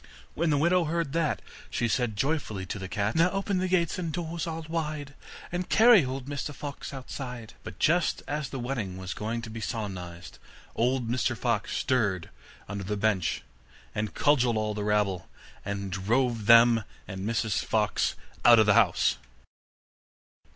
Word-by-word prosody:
When 170 Hz, +1 st, 0 dB
the 145 Hz, -, +3 dB
widow 170 Hz, +3 st, +3 dB
heard 165 Hz, -2 st, -1 dB
that, 165 Hz, -2 st, 0 dB, 0.3 s
she 120 Hz, -, 0 dB
said 120 Hz, -2 st, 0 dB
joyfully 110 Hz, -6 st, -1 dB
to 100 Hz, -, -5 dB
the 95 Hz, -, -5 dB
cat: 100 Hz, +3 st, -1 dB
'Now 165 Hz, +2 st, +4 dB
open 195 Hz, 0 st, -1 dB
the 185 Hz, -, 0 dB
gates 180 Hz, -2 st, +1 dB
and 170 Hz, -3 st, -2 dB
doors 165 Hz, 0 st, -3 dB
all 165 Hz, 0 st, -4 dB
wide, 155 Hz, -3 st, -3 dB, 0.4 s
And 180 Hz, +1 st, -3 dB
carry 225 Hz, -5 st, +7 dB
old 130 Hz, 0 st, -4 dB
Mr 145 Hz, +1 st, -4 dB
Fox 140 Hz, 0 st, -6 dB
outside.' 125 Hz, -3 st, -7 dB
But -, -, -8 dB
just 170 Hz, +1 st, +2 dB
as 145 Hz, -3 st, -2 dB
the 135 Hz, -, -5 dB
wedding 120 Hz, -7 st, -3 dB
was 95 Hz, -2 st, -5 dB
going 115 Hz, +2 st, -3 dB
to 110 Hz, -, -7 dB
be 115 Hz, 0 st, -6 dB
solemnized, 95 Hz, -6 st, -5 dB, 0.4 s
old 125 Hz, 0 st, +1 dB
Mr 120 Hz, 0 st, 0 dB
Fox 115 Hz, -4 st, -1 dB
stirred 105 Hz, -9 st, 0 dB, 0.4 s
under 100 Hz, 0 st, -4 dB
the 105 Hz, +2 st, -2 dB
bench, 100 Hz, -4 st, 0 dB, 0.5 s
and 105 Hz, 0 st, -3 dB
cudgelled 125 Hz, -6 st, +3 dB
all 105 Hz, 0 st, -1 dB
the 105 Hz, 0 st, -3 dB
rabble, 105 Hz, -4 st, 0 dB, 0.3 s
and 100 Hz, -1 st, -4 dB
drove 115 Hz, +4 st, 0 dB
them 115 Hz, -1 st, +7 dB, 0.2 s
and 95 Hz, -2 st, -6 dB
Mrs 110 Hz, 0 st, 0 dB
Fox 105 Hz, -3 st, +1 dB, 0.3 s
out 120 Hz, 0 st, +8 dB
of 110 Hz, -, +6 dB
the 105 Hz, -, +5 dB
house. -, -, +3 dB
120 Hz, 165 wpm, -28 LUFS, 105-150 Hz, 0.5 s, out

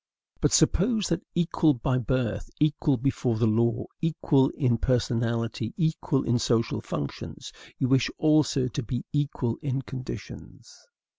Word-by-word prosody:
But -, -, +2 dB
suppose 215 Hz, +2 st, +3 dB
that, 170 Hz, -, 0 dB
equal 165 Hz, -3 st, +2 dB
by 125 Hz, +2 st, 0 dB
birth, 125 Hz, -2 st, -2 dB
equal 150 Hz, -2 st, +2 dB
before 125 Hz, -2 st, 0 dB
the 120 Hz, -, +2 dB
law, 115 Hz, +2 st, +1 dB, 0.2 s
equal 155 Hz, -4 st, +2 dB
in 125 Hz, -5 st, +2 dB
personality, 115 Hz, -2 st, -1 dB
equal 160 Hz, -4 st, 0 dB
in 120 Hz, +1 st, +1 dB
social 115 Hz, -1 st, +1 dB
functions, 70 Hz, -2 st, -6 dB, 0.3 s
you 130 Hz, -, 0 dB
wish 130 Hz, -1 st, +3 dB
also 150 Hz, -4 st, +3 dB
to 140 Hz, -, -4 dB
be 120 Hz, +1 st, -4 dB
equal 140 Hz, -5 st, -1 dB
in 135 Hz, -1 st, -2 dB
conditions. 130 Hz, 0 st, -9 dB
130 Hz, 135 wpm, -27 LUFS, 115-150 Hz, 0.3 s, suppose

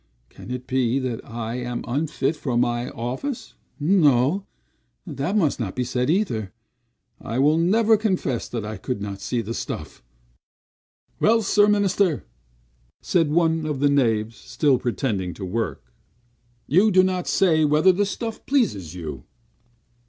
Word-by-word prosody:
Can -, -, -12 dB
it 125 Hz, 0 st, -5 dB
be, 130 Hz, -1 st, +1 dB
that 130 Hz, -4 st, -3 dB
I 115 Hz, +1 st, -5 dB
am 125 Hz, -1 st, -4 dB
unfit 145 Hz, +2 st, -1 dB
for 130 Hz, -5 st, -2 dB
my 120 Hz, 0 st, 0 dB
office? 130 Hz, -, -5 dB, 0.3 s
No, 150 Hz, +1 st, +3 dB, 0.6 s
that 165 Hz, +5 st, -2 dB
must 155 Hz, -10 st, +1 dB
not 105 Hz, -6 st, -3 dB
be 125 Hz, -, 0 dB
said 125 Hz, +1 st, -1 dB
either. 135 Hz, -, 0 dB, 0.7 s
I 115 Hz, -, -4 dB
will 150 Hz, +4 st, +4 dB
never 215 Hz, +6 st, +4 dB
confess 185 Hz, -, -1 dB
that 115 Hz, -4 st, -4 dB
I 110 Hz, +1 st, -5 dB
could 125 Hz, -5 st, -4 dB
not 100 Hz, -1 st, -6 dB
see 120 Hz, +3 st, -1 dB
the 115 Hz, +1 st, -5 dB
stuff." -, -, -6 dB, 1.2 s
"Well, 225 Hz, +1 st, +3 dB
Sir 205 Hz, +1 st, +4 dB
Minister!" 200 Hz, -5 st, +2 dB, 0.8 s
said 165 Hz, -4 st, +2 dB
one 160 Hz, 0 st, +1 dB
of 150 Hz, -3 st, -2 dB
the 145 Hz, +1 st, +3 dB
knaves, 115 Hz, -5 st, +1 dB
still 140 Hz, -5 st, +1 dB
pretending 105 Hz, -7 st, -2 dB
to 95 Hz, -, -6 dB
work. 90 Hz, -, -4 dB, 0.7 s
"You 190 Hz, +9 st, +4 dB
do 185 Hz, -2 st, +5 dB
not 185 Hz, -1 st, -1 dB
say 160 Hz, -5 st, +3 dB
whether 150 Hz, +5 st, +5 dB
the 200 Hz, +2 st, 0 dB
stuff 225 Hz, +2 st, -5 dB
pleases 100 Hz, -, 0 dB
you." 75 Hz, -8 st, -7 dB
135 Hz, 145 wpm, -23 LUFS, 115-185 Hz, 1.2 s, do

